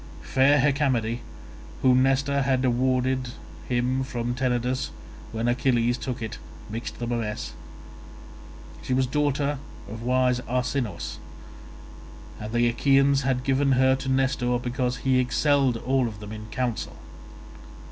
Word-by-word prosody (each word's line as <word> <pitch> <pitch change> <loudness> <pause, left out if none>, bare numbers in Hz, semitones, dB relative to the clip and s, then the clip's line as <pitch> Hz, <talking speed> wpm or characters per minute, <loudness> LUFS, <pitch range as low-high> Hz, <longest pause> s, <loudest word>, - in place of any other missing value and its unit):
Fair 135 +2 +4
Hecamede, 130 -5 +1 0.6
whom 130 -1 +5
Nestor 135 +1 +2
had - - -1 0.2
had - - 0
awarded 130 +1 +1
to 120 - -7 0.4
him 125 +2 +1
from 120 -2 -3
Tenedos 125 0 -1 0.4
when 115 +1 -2
Achilles 120 -1 +2
took 120 -1 -4
it, 110 - -5 0.3
mixed 115 +3 -5
them 120 0 -3
a 120 - +1
mess; 105 -2 -4 1.3
she 130 - -1
was 130 0 +3
daughter 145 +1 0 0.3
of 110 +2 -7
wise 125 0 +2
Arsinous, 125 -5 -2 1.2
and 105 +1 -6
the 120 0 +3
Achaeans 135 +3 +3
had 130 -1 0
given 135 +1 +2
her 130 +1 +4
to 135 - -5
Nestor 130 -2 +1
because 125 0 -2
he 130 +1 +2
excelled 135 0 +2
all 130 +1 +1
of 105 -2 -7
them 105 0 -8
in 110 0 -7
counsel. 120 +1 -3
125 Hz, 135 wpm, -25 LUFS, 120-135 Hz, 1.3 s, whom